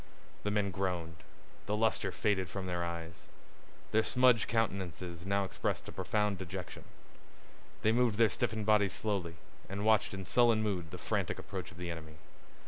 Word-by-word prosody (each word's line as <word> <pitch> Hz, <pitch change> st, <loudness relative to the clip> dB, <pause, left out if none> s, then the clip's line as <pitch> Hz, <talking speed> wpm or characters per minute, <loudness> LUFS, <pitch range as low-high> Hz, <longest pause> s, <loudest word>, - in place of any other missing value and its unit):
The 105 Hz, -, -1 dB
men 105 Hz, -1 st, +1 dB
groaned. 90 Hz, -3 st, -2 dB, 0.5 s
The 105 Hz, +1 st, 0 dB
luster 110 Hz, -3 st, +2 dB
faded 95 Hz, -2 st, 0 dB
from 95 Hz, 0 st, -4 dB
their 90 Hz, -1 st, -1 dB
eyes. 85 Hz, -1 st, -6 dB, 0.6 s
Their 110 Hz, +1 st, +4 dB
smudged 125 Hz, -1 st, +4 dB
countenances 95 Hz, -5 st, -2 dB
now 100 Hz, 0 st, +2 dB
expressed 95 Hz, -, -2 dB
a -, -, -6 dB
profound 105 Hz, -3 st, 0 dB
dejection. 95 Hz, -1 st, -6 dB, 1.0 s
They 110 Hz, -, +5 dB
moved 120 Hz, -2 st, +3 dB
their 115 Hz, 0 st, +6 dB
stiffened 110 Hz, -1 st, -1 dB
bodies 105 Hz, -3 st, +4 dB
slowly, 95 Hz, -6 st, -2 dB, 0.3 s
and 100 Hz, +2 st, -3 dB
watched 110 Hz, -2 st, +3 dB
in 95 Hz, -1 st, -6 dB
sullen 115 Hz, +1 st, +4 dB
mood 90 Hz, -6 st, -1 dB
the -, -, -7 dB
frantic -, -, -1 dB
approach 95 Hz, -3 st, -6 dB
of 90 Hz, -, -14 dB
the 90 Hz, -1 st, -4 dB
enemy. 80 Hz, -2 st, -8 dB
100 Hz, 160 wpm, -33 LUFS, 90-110 Hz, 1.0 s, their